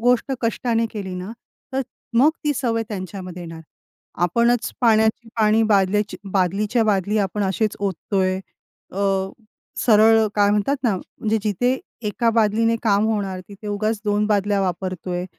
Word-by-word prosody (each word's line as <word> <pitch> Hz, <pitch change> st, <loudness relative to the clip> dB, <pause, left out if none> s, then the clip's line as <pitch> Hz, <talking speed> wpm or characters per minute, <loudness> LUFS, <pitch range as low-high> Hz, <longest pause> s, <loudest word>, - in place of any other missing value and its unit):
गोष्ट 245 Hz, +3 st, +2 dB
कष्टाने 230 Hz, 0 st, 0 dB
केली 195 Hz, -4 st, -5 dB
ना, 180 Hz, +3 st, -6 dB, 0.4 s
तर 265 Hz, -, 0 dB, 0.4 s
मग 285 Hz, +5 st, +6 dB
ती 295 Hz, -, +2 dB
सवय 235 Hz, -4 st, 0 dB
त्यांच्यामध्ये 185 Hz, -3 st, -6 dB
येणार. 165 Hz, -1 st, -8 dB, 0.6 s
आपणच 235 Hz, +6 st, +2 dB
पाण्याची 220 Hz, 0 st, +3 dB
पाणी, 220 Hz, 0 st, +4 dB
बादल्याची 210 Hz, -1 st, +2 dB, 0.2 s
बादलीच्या 205 Hz, +5 st, +1 dB
बादली 205 Hz, 0 st, +1 dB
आपण 205 Hz, +1 st, -1 dB
असेच 200 Hz, +2 st, 0 dB
ओततोय, 190 Hz, -1 st, -1 dB, 0.5 s
अ, -, -, -10 dB, 0.8 s
सरळ 220 Hz, 0 st, +5 dB
काय 205 Hz, -1 st, +4 dB
म्हणतात 210 Hz, +7 st, +1 dB
ना, 225 Hz, -7 st, +2 dB
म्हणजे 220 Hz, +4 st, -3 dB
जिथे 245 Hz, +5 st, +1 dB, 0.3 s
1 230 Hz, +3 st, +1 dB
बादलीने 225 Hz, +1 st, +2 dB
काम 205 Hz, -2 st, +3 dB
होणार 200 Hz, -4 st, -2 dB
तिथे 200 Hz, +1 st, -11 dB
उगाच 215 Hz, +1 st, -1 dB
2 210 Hz, 0 st, +1 dB
बादल्या 205 Hz, -1 st, +1 dB
वापरतोय, 180 Hz, -1 st, -3 dB
210 Hz, 135 wpm, -22 LUFS, 195-225 Hz, 0.8 s, मग